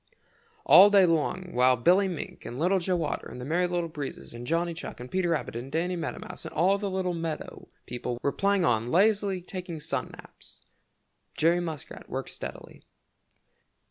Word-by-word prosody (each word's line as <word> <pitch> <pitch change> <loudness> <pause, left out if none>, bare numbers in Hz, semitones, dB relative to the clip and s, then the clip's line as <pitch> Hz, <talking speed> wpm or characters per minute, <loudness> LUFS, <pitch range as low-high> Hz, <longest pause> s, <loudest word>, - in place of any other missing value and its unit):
All 200 +2 +9
day 200 -2 +6
long 175 +2 0
while 125 +1 +4
Billy 180 +11 +4
Mink 175 -5 -6
and 120 - -7
Little 180 +6 +2
Joe 180 -1 0
Otter 150 - -3
and - - -9
the 125 - -6
Merry 175 +5 +1
Little 175 -1 -1
Breezes 150 -7 -7
and 120 +1 -8
Johnny 170 +2 0
Chuck 165 - -8
and 125 +1 -9
Peter 185 -2 0
Rabbit 165 -7 -1
and 125 +3 -6
Danny 175 +4 0
Meadow 170 -2 -4
Mouse - - -8
and - - -8
all 190 +5 +3
the 205 - -2
other 190 - -3
little 185 -1 0
meadow 165 -2 -5 0.2
people 120 0 -4
were 140 - +2
playing 200 0 +1
or 110 - +3
lazily 195 - +2
taking 180 -3 -6
sun 150 - -3
naps, - - -13 0.7
Jerry 170 +2 +3
Muskrat 160 -5 -7
worked - - -4
steadily. - - -9
170 Hz, 185 wpm, -28 LUFS, 150-185 Hz, 0.7 s, All